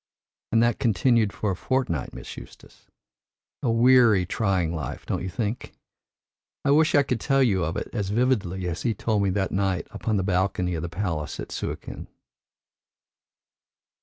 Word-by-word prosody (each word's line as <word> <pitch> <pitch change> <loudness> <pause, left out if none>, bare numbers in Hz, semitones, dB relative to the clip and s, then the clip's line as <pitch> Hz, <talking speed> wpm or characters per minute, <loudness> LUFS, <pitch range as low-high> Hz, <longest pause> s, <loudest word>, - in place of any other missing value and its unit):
And 115 +1 +4
that 120 -2 +1
continued 115 0 +2
for 105 -1 -2
a - - -2
fortnight, 120 - -1
Miss - - -9
Eustace! - - -14 0.7
A 125 - 0
weary, 115 -4 +5
trying 95 -4 0
life, 70 -6 -5
don't - - -2
you 95 - -3
think? 110 +4 -4 0.9
I 140 - +4
wish 155 +2 +4
I 145 - +6
could 125 -3 -2
tell 135 +3 +2
you 95 -7 +2
of 85 0 -2
it - - -3
as 100 -5 -2
vividly 100 -6 0
as 85 +1 -3
he 115 -3 0
told 105 0 0
me 100 - +2
that 95 0 -1
night 95 -2 0
upon 110 -2 -1
the 95 - 0
balcony 95 -1 0
of 80 - -3
the 85 - -4
palace 85 -4 -3
at - - -6
Suakin." - - -5
100 Hz, 165 wpm, -25 LUFS, 90-120 Hz, 0.9 s, I